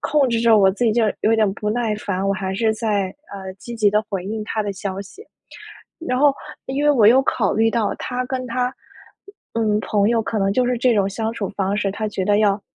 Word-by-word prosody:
控 295 Hz, -3 st, +2 dB
制 230 Hz, -1 st, 0 dB
着 230 Hz, -1 st, +5 dB
我 195 Hz, -2 st, +5 dB
自 205 Hz, +6 st, -2 dB
己 220 Hz, -, +3 dB
就 230 Hz, +1 st, +2 dB, 0.2 s
有 220 Hz, -, +3 dB
点 215 Hz, -2 st, +3 dB
不 210 Hz, +1 st, -4 dB
耐 225 Hz, -1 st, 0 dB
烦， 195 Hz, -2 st, -3 dB
我 195 Hz, -, +2 dB
还 190 Hz, -1 st, -3 dB
是 220 Hz, +2 st, +1 dB
在， 205 Hz, -4 st, -1 dB, 0.2 s
呃， 190 Hz, -1 st, -7 dB
积 235 Hz, +5 st, -8 dB
极 210 Hz, -2 st, +3 dB
地 210 Hz, +1 st, +2 dB
回 190 Hz, -3 st, -4 dB
应 215 Hz, +2 st, -4 dB
他 215 Hz, 0 st, -2 dB
的 205 Hz, -, -3 dB
消 190 Hz, 0 st, -5 dB
息。 290 Hz, -, -14 dB, 0.8 s
然 250 Hz, 0 st, 0 dB
后 290 Hz, 0 st, +5 dB, 0.3 s
因 275 Hz, +2 st, -2 dB
为 295 Hz, -, +5 dB
我 235 Hz, -8 st, +4 dB
又 255 Hz, +4 st, +6 dB
考 225 Hz, -6 st, 0 dB
虑 225 Hz, +1 st, +3 dB
到 225 Hz, -3 st, 0 dB
他 250 Hz, 0 st, -3 dB
跟 255 Hz, 0 st, -3 dB
他 250 Hz, +1 st, -1 dB, 0.8 s
嗯， 215 Hz, -2 st, +1 dB
朋 205 Hz, -1 st, +1 dB
友 235 Hz, -1 st, +2 dB
可 220 Hz, 0 st, -3 dB
能 195 Hz, 0 st, +1 dB
就 250 Hz, +4 st, +1 dB
是 250 Hz, 0 st, 0 dB
这 245 Hz, +1 st, +3 dB
种 200 Hz, -2 st, +2 dB
相 220 Hz, +3 st, -3 dB
处 210 Hz, -4 st, -4 dB
方 195 Hz, 0 st, -1 dB
式， 200 Hz, -1 st, 0 dB
他 215 Hz, +2 st, -3 dB
觉 195 Hz, -2 st, -3 dB
得 205 Hz, +1 st, +3 dB
要 205 Hz, -1 st, +2 dB
215 Hz, 260 characters per minute, -21 LUFS, 200-235 Hz, 0.8 s, 又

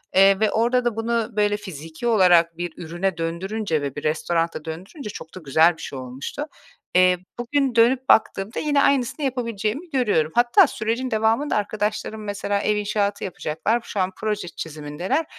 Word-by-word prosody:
Eee, 195 Hz, 0 st, +6 dB
ve 215 Hz, -1 st, +2 dB
orada 240 Hz, +2 st, +2 dB
da 240 Hz, -3 st, 0 dB
bunu, 230 Hz, 0 st, -1 dB
böyle, 205 Hz, 0 st, +2 dB
fiziki 165 Hz, 0 st, -7 dB
olarak 175 Hz, -6 st, +4 dB
bir 175 Hz, -1 st, -4 dB
ürüne 175 Hz, +2 st, -3 dB
döndürünce 170 Hz, +1 st, -2 dB
ve 140 Hz, -2 st, -4 dB
bir 145 Hz, -, -6 dB
restorana 165 Hz, +1 st, -1 dB
döndürünce 185 Hz, -, -7 dB
çok 160 Hz, -5 st, -9 dB
da -, -, -7 dB
güzel 160 Hz, +4 st, +4 dB
bir 165 Hz, -, -11 dB
şey 135 Hz, -, -6 dB
olmuştu. 130 Hz, -, -6 dB, 0.5 s
Eee, 185 Hz, 0 st, +5 dB, 0.2 s
bugün 265 Hz, +1 st, 0 dB
dönüp 250 Hz, +3 st, +3 dB
baktığımda 205 Hz, -1 st, +2 dB
yine 290 Hz, -2 st, +2 dB
aynısını 280 Hz, +2 st, +1 dB
yapabileceğimi 240 Hz, -, -2 dB
görüyorum. 210 Hz, -, +1 dB
Hatta 245 Hz, +10 st, +5 dB
sürecin 235 Hz, +2 st, -2 dB
devamında 225 Hz, +6 st, +1 dB
arkadaşlarım, 215 Hz, +1 st, -2 dB
mesela, 205 Hz, 0 st, -2 dB
ev 210 Hz, -, +1 dB
inşaatı 205 Hz, -1 st, -1 dB
yapacaklar. 195 Hz, +6 st, -1 dB
Şu 205 Hz, -, -5 dB
an 185 Hz, 0 st, +1 dB
proje 210 Hz, -4 st, -2 dB
çizimindeler. 160 Hz, -, -3 dB
205 Hz, 160 wpm, -23 LUFS, 170-235 Hz, 0.5 s, Eee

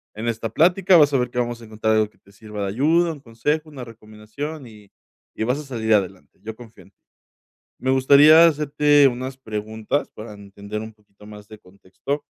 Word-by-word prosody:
en 110 Hz, +2 st, -5 dB
esta 115 Hz, -1 st, -3 dB
plática 180 Hz, -, +3 dB
vas 145 Hz, -2 st, +4 dB
a -, -, +3 dB
ver 125 Hz, -1 st, -1 dB
que 125 Hz, -, -4 dB
vamos 120 Hz, -1 st, -3 dB
a 115 Hz, -, -12 dB
encontrar 110 Hz, 0 st, -2 dB
algo 110 Hz, -1 st, +1 dB
que -, -, -32 dB
te 100 Hz, -, -24 dB
sirva 105 Hz, 0 st, -8 dB
de -, -, -2 dB
ayuda, 160 Hz, -, +1 dB
un 145 Hz, -, -14 dB
consejo, 150 Hz, +7 st, -3 dB
una 130 Hz, -5 st, -9 dB
recomendación 115 Hz, +6 st, -9 dB
y 105 Hz, -3 st, -17 dB, 0.4 s
y -, -, -4 dB
vas 125 Hz, +5 st, -1 dB
a -, -, -8 dB
salir 115 Hz, -5 st, -2 dB
adelante. 95 Hz, -2 st, -2 dB
Yo 110 Hz, 0 st, -7 dB
confío 115 Hz, -2 st, -15 dB
en -, -, -23 dB
ti. -, -, -64 dB, 0.8 s
Me 130 Hz, -, -2 dB
gustaría 145 Hz, +5 st, +6 dB
hacerte 145 Hz, -1 st, +2 dB
unas 130 Hz, +1 st, -3 dB
preguntas 110 Hz, +2 st, -4 dB
para 105 Hz, 0 st, -11 dB
entender 100 Hz, +1 st, -9 dB
un 110 Hz, 0 st, -9 dB
poquito 105 Hz, -1 st, -21 dB
más 105 Hz, -1 st, -13 dB
de 110 Hz, 0 st, -14 dB
contexto. 100 Hz, +10 st, -7 dB
115 Hz, 205 wpm, -21 LUFS, 105-145 Hz, 0.8 s, gustaría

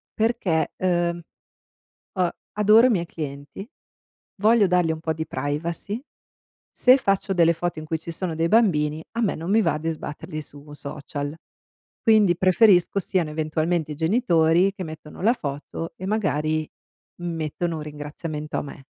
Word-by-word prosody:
perché 210 Hz, -8 st, +1 dB
ehm, 175 Hz, -1 st, 0 dB, 0.9 s
uhm, 180 Hz, -2 st, +2 dB, 0.2 s
adoro 210 Hz, +3 st, +6 dB
i -, -, +2 dB
miei 180 Hz, -7 st, +1 dB
clienti, 145 Hz, -, -7 dB, 0.7 s
voglio 220 Hz, 0 st, +5 dB
dargli 180 Hz, -2 st, +2 dB
un 160 Hz, -, -4 dB
po' 160 Hz, 0 st, -2 dB
di 160 Hz, 0 st, -5 dB
privacy, 165 Hz, -, -3 dB, 0.7 s
se 255 Hz, +1 st, +5 dB
faccio 195 Hz, -4 st, 0 dB
delle 170 Hz, -2 st, +4 dB
foto 175 Hz, +1 st, -3 dB
in 155 Hz, -, -8 dB
cui 160 Hz, +1 st, -2 dB
ci 160 Hz, -, -10 dB
sono 170 Hz, 0 st, -3 dB
dei 165 Hz, +1 st, +1 dB
bambini 160 Hz, -8 st, +2 dB
a 230 Hz, -, -2 dB
me 215 Hz, -, +1 dB
non 165 Hz, +4 st, -4 dB
mi 220 Hz, +2 st, +5 dB
va 150 Hz, -, +1 dB
di 160 Hz, +2 st, -3 dB
sbatterli 155 Hz, +1 st, -6 dB
su 145 Hz, 0 st, -11 dB
un 150 Hz, -, -11 dB
social. 145 Hz, 0 st, -5 dB, 0.7 s
Quindi 210 Hz, -6 st, +5 dB
preferisco 185 Hz, 0 st, +4 dB
siano 180 Hz, -5 st, -1 dB
eventualmente 155 Hz, +1 st, -1 dB
i -, -, -8 dB
genitori 170 Hz, -, +3 dB
che 190 Hz, -2 st, -6 dB
mettono 155 Hz, -1 st, -10 dB
la 225 Hz, +4 st, +5 dB
foto 150 Hz, -, -6 dB
e 185 Hz, -, -6 dB
magari 155 Hz, -7 st, 0 dB, 0.6 s
mettono 165 Hz, 0 st, -3 dB
un -, -, -5 dB
ringraziamento 150 Hz, +1 st, -6 dB
a -, -, -1 dB
me. 140 Hz, -1 st, -10 dB
165 Hz, 160 wpm, -24 LUFS, 155-195 Hz, 0.9 s, adoro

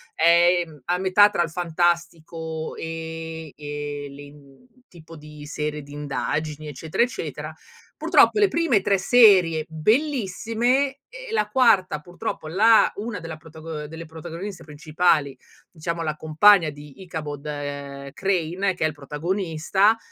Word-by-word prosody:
è, 175 Hz, +2 st, +4 dB
mhmm, 150 Hz, -4 st, -16 dB
a 175 Hz, -, 0 dB
metà 190 Hz, +2 st, +5 dB
tra 175 Hz, -, 0 dB
il 165 Hz, -, -4 dB
fantastico 165 Hz, -1 st, -2 dB
e 160 Hz, -1 st, -6 dB
e 145 Hz, 0 st, -6 dB
le 140 Hz, +1 st, -11 dB
i 145 Hz, -, -12 dB
mhmm, 140 Hz, -, -19 dB, 0.2 s
tipo 165 Hz, -1 st, -14 dB
di 150 Hz, -1 st, -12 dB
serie 150 Hz, 0 st, -4 dB
di 145 Hz, +1 st, -13 dB
indagini, 150 Hz, +1 st, -3 dB
eccetera, 155 Hz, -, -1 dB
eccetera. 245 Hz, -, -5 dB, 0.4 s
Purtroppo 425 Hz, -, +4 dB
le 410 Hz, -, +5 dB
prime 330 Hz, -, +2 dB
3 195 Hz, +1 st, +2 dB
serie 185 Hz, -7 st, +5 dB
bellissime, 240 Hz, -, 0 dB
e -, -, -10 dB
la 210 Hz, -, 0 dB
quarta 205 Hz, -, +3 dB
purtroppo 175 Hz, -1 st, -6 dB
la 215 Hz, +7 st, +5 dB
una 215 Hz, +1 st, -5 dB
della 165 Hz, -1 st, -7 dB
protago 160 Hz, 0 st, -9 dB
ehm, -, -, -6 dB
delle 160 Hz, +2 st, -9 dB
protagoniste 170 Hz, +3 st, -8 dB
principali, 155 Hz, -1 st, 0 dB, 0.3 s
diciamo 170 Hz, +1 st, -4 dB
la 155 Hz, -2 st, -2 dB
compagna 160 Hz, +3 st, +5 dB
di 145 Hz, +3 st, -12 dB
Ichabod, 155 Hz, -5 st, -6 dB
ehm, 140 Hz, -1 st, -6 dB
Crane, 190 Hz, +1 st, 0 dB
che 175 Hz, -, -1 dB
è -, -, +4 dB
il 155 Hz, -, -4 dB
protagonista, 170 Hz, +7 st, 0 dB
165 Hz, 145 wpm, -23 LUFS, 150-190 Hz, 0.4 s, metà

